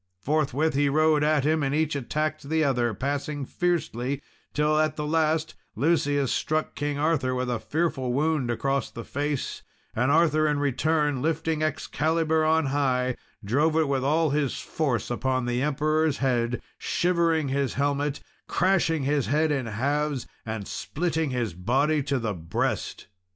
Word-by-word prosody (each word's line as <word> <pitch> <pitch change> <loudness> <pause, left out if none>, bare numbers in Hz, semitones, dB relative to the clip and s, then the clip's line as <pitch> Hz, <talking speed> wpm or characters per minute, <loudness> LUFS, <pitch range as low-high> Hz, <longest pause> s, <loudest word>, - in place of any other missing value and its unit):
Forthwith 150 +4 +1
he 140 +1 +2
rode 155 +1 +3
at 150 -2 +3
him, 155 +2 +2
and 140 0 0
each 155 -1 +1
attacked 155 +2 -2
the 160 0 +2
other 120 -4 +1
passing 145 +3 -2
fiercely; 140 -6 -1 0.3
till 150 +1 +2
at 155 0 +1
the 150 - -3
last, 160 0 +1 0.2
Lucius 145 0 +1
struck 155 0 -1
King 145 0 -2
Arthur 145 -4 +1
with 125 0 -1
a 120 - -1
fearful 145 -3 -1
wound 145 -1 +1
across 135 +2 0
the 115 - -8
face, 145 +1 -3 0.3
and 125 +4 +2
Arthur, 155 -1 +4
in 150 -1 +1
return, 145 0 +1
lifting 160 +1 0
up 155 - +3
Excalibur 160 +1 0
on 160 0 +3
high, 130 -3 +1 0.3
drove 150 +9 +2
it 160 -2 +3
with 135 -2 0
all 155 +2 +2
his 145 -2 0
force 125 -9 -2
upon 130 +1 0
the 120 0 -1
Emperor's 155 +1 +1
head, 120 -3 0 0.2
shivering 170 -4 +1
his 135 -2 -1
helmet, 145 +1 0 0.3
crashing 170 -5 +2
his 140 -1 +1
head 155 +5 +2
in 135 -5 -1
halves, 140 +5 -1 0.2
and 110 -3 -4
splitting 160 -1 -2
his 120 -7 -2
body 135 - +1
to 140 0 -1
the 115 -4 -2
breast. 85 -2 -3
145 Hz, 155 wpm, -26 LUFS, 130-155 Hz, 0.3 s, Arthur